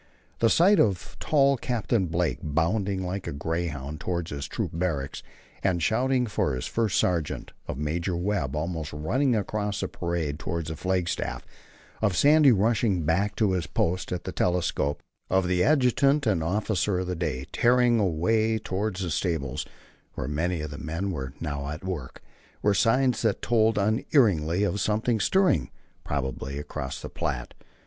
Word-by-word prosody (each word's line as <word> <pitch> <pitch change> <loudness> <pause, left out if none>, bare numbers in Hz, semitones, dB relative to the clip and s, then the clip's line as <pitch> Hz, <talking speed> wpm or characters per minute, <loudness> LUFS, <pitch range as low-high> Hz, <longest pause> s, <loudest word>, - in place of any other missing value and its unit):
The 115 - +4
sight 190 - +5
of 95 -5 +1
tall 140 -2 +3
Captain 115 -5 0
Blake 85 0 0
bounding 95 +5 0
like 90 +1 -4
a - - -2
greyhound 75 -1 -3
toward 85 -1 -2
his 70 0 -4
troop - - -3
barracks, 80 -6 -2 0.4
and 95 -3 +1
shouting 125 +4 +2
for 75 - 0
his 65 - -4
first 115 -4 0
sergeant, 85 -5 -1 0.2
of - - -4
Major 85 +4 -1
Webb 85 -7 -1
almost 80 -1 -3
running 120 - +1
across 105 -1 -2
the 95 - -1
parade 85 -5 -3
toward 85 0 -3
the 80 +1 -4
flagstaff, 90 +1 -2 0.6
of 105 -4 +1
Sandy 150 -1 +6
rushing 105 -4 +2
back 95 +7 +1
to 105 -4 +2
his 90 -5 -1
post 90 +3 -1
at 90 - -3
the 95 - -4
telescope, 85 -6 0 0.3
of 95 -1 +2
the 90 0 +2
adjutant 140 0 +3
and 95 -8 +1
officer 100 +1 0
of 90 - -1
the 90 0 -3
day 75 -6 -2
tearing 120 -1 +4
away 110 +5 +2
toward 100 0 -2
the 90 -3 -3
stables, 80 -6 -2 0.5
where 65 - -3
many 80 +3 -1
of 75 -1 -5
the 75 - -7
men 85 +5 -3
were 65 -5 -5
now 70 -3 -3
at 75 +3 -6
work, 85 -9 -5 0.4
were 105 - +4
signs 125 +4 +2
that 110 -3 0
told 110 -2 +3
unerringly 100 - +2
of 105 0 0
something 110 +2 +1
stirring, 180 - +2 0.3
probably 70 0 -3
across 65 -2 -5
the - - -6
Platte. - - -3
90 Hz, 160 wpm, -26 LUFS, 80-110 Hz, 0.6 s, Sandy